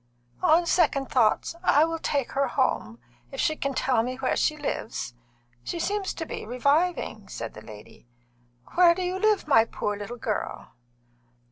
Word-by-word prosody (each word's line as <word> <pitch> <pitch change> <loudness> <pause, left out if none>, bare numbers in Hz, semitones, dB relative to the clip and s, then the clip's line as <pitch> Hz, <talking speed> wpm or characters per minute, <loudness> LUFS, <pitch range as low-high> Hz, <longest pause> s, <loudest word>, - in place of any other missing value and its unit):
"On 335 +3 +4
second 275 -6 +2
thoughts, 235 +2 +2
I 300 -2 +5
will 330 0 -3
take 280 -4 -1
her 275 0 +1
home, 115 - 0 0.3
if - - -7
she 310 - +2
can 275 -2 -3
tell 255 -4 +2
me 250 +2 -3
where 265 0 -1
she 305 - +1
lives. 225 - -4 0.5
She 340 - -4
seems 400 +2 -1
to 325 - -4
be - - -6
reviving," 255 - 0
said 115 -1 -6
the 110 - -10
lady. 105 +2 -13 0.7
"Where 345 -1 +6
do 370 - -3
you 365 +1 -2
live, 425 -4 +2
my 225 -7 +6
poor 205 -2 -3
little 205 +4 -7
girl?" 220 -3 -4
275 Hz, 165 wpm, -26 LUFS, 225-335 Hz, 0.7 s, Where